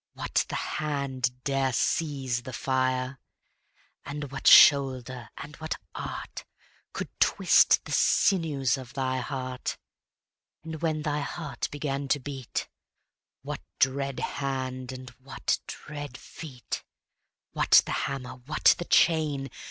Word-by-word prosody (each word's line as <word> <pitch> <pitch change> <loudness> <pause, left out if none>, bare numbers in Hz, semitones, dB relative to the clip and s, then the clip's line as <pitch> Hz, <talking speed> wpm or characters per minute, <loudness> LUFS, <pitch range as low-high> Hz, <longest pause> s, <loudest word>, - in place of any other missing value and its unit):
What - - 0
the - - -3
hand 130 -4 -2
dare 135 -2 +1
seize 135 -2 0
the 130 +1 -8
fire? 130 0 0 0.8
And 145 -1 -6
what 140 - -3
shoulder 130 -4 +6
and 150 +2 -8
what 155 0 -3 0.2
art - - -6 0.5
Could - - -5
twist - - +5
the - - -8
sinews 145 -9 +2
of 125 -2 -10
thy 130 -1 0
heart? 130 -1 -4 0.9
And 160 -1 -7
when 155 -2 0
thy 150 -1 0
heart 150 +2 -4
began 140 -1 -3
to 145 +2 +2
beat, 135 -2 -5 0.8
What - - -5 0.2
dread 135 0 +1
hand 130 -2 -3
and 130 0 -9
what 135 +1 -1
dread 145 -3 -7
feet? 130 -8 -7 0.7
What - - +5
the - - -4 0.2
hammer? 130 -2 -6
what 155 - +5
the 175 - -3
chain? 150 -6 +2
135 Hz, 120 wpm, -28 LUFS, 130-145 Hz, 0.9 s, shoulder